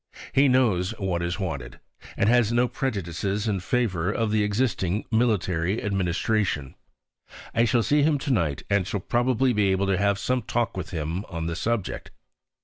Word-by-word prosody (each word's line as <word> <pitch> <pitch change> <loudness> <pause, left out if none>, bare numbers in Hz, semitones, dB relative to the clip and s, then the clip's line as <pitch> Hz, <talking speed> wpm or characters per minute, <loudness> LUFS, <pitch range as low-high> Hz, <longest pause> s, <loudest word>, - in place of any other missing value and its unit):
He 140 +1 +5
knows 115 -6 +2
what 95 -4 -1
is 85 +3 -2
wanted, 70 -10 -5 0.4
and 100 - +2
has 120 -1 +4
no 120 +1 +3
prejudices 100 -4 -2
in 100 -3 0
favour 95 -3 0
of 110 -1 -1
the 110 -1 +2
existing 105 -2 0
military 100 -5 +1
administration. 95 -5 -1 0.8
I 115 +1 +3
shall 115 0 +2
see 145 +4 +3
him 150 0 +3
to 140 +1 -3
night 80 - 0
and 100 -2 +1
shall 105 - -2
probably 120 +5 +1
be 105 -2 +2
able 95 +1 +1
to 95 -2 +1
have 100 0 +2
some 125 +4 0
talk 120 +1 -1
with 90 -3 -5
him 85 +1 -3
on 85 -3 -5
the 85 0 -2
subject. 115 +1 -2
100 Hz, 170 wpm, -25 LUFS, 90-120 Hz, 0.8 s, He